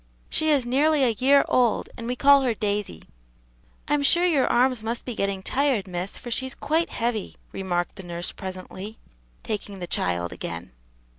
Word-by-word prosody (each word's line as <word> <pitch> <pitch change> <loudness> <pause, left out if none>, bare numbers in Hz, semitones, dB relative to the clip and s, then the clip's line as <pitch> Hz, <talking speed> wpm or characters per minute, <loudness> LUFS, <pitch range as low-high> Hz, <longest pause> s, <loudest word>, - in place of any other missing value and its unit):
"She 315 - +1
is 280 -5 +3
nearly 285 +4 +3
a 250 - +4
year 265 +5 +4
old, 245 -3 +2
and 230 - -7
we 250 - -1
call 280 +2 +6
her 245 -4 +1
Daisy." 205 - -2 0.8
"I'm 295 0 +2
sure 340 +5 +4
your 300 -7 +3
arms 250 -1 +3
must 230 +2 -3
be 245 - -4
getting 200 -2 -2
tired, 265 -6 +1
miss, 180 +1 -4
for 240 - -8
she's 260 +3 -2
quite 325 +3 0
heavy," 230 -3 -2 0.2
remarked 180 -1 -2
the - - -7
nurse 175 0 -4
presently, 190 +2 -7 0.5
taking 205 -2 -4
the 180 - -5
child 85 - -1
again. 85 -6 -6
230 Hz, 170 wpm, -25 LUFS, 190-270 Hz, 0.8 s, call